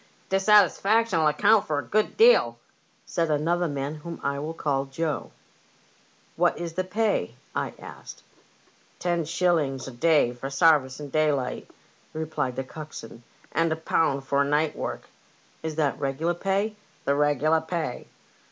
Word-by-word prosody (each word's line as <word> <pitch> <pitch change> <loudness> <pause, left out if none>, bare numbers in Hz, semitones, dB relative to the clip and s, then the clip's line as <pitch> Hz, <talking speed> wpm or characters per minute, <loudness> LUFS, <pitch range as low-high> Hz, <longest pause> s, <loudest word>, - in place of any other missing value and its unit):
" - - -34
Dissatisfaction'll 205 -2 +4
account 195 +8 +3
for 150 - -1
a 145 - -1
good 215 +1 0
deal," 475 +2 +5 0.5
said 165 -1 -1
another 170 +4 +1
man, 140 -1 -3
whom 165 +2 -8
I 140 0 -1
will 155 +3 -5
call 140 -3 -1
Joe. 150 +3 -3 0.5
" - - -34
What 175 +1 +2
is 170 -1 -5
the 185 - -1
pay? 200 - -1
" - - -32
I - - -9
asked. - - -11 0.4
" - - -34 0.3
Ten 175 -2 0
shillings 155 -6 0
a - - -6
day 135 -1 +3
for 125 +2 -6
sarvice 140 -2 +3
in 145 -2 -8
daylight," 150 -4 0 0.4
replied 155 -5 -3
the 135 - -2
coxswain, 130 -5 -10 0.3
and 165 0 +1
a - - +1
pound 160 -3 0
for 140 +1 +2
night 150 +2 +1
work." - - -5 0.3
" - - -33
Is 160 -1 -4
that 150 -3 0
the - - -15
regular 145 +5 0
pay? 195 +4 -1
" - - -33
" - - -33
The 140 - +2
regular 150 +2 +2
pay." 160 -5 -4
155 Hz, 170 wpm, -26 LUFS, 140-175 Hz, 0.5 s, deal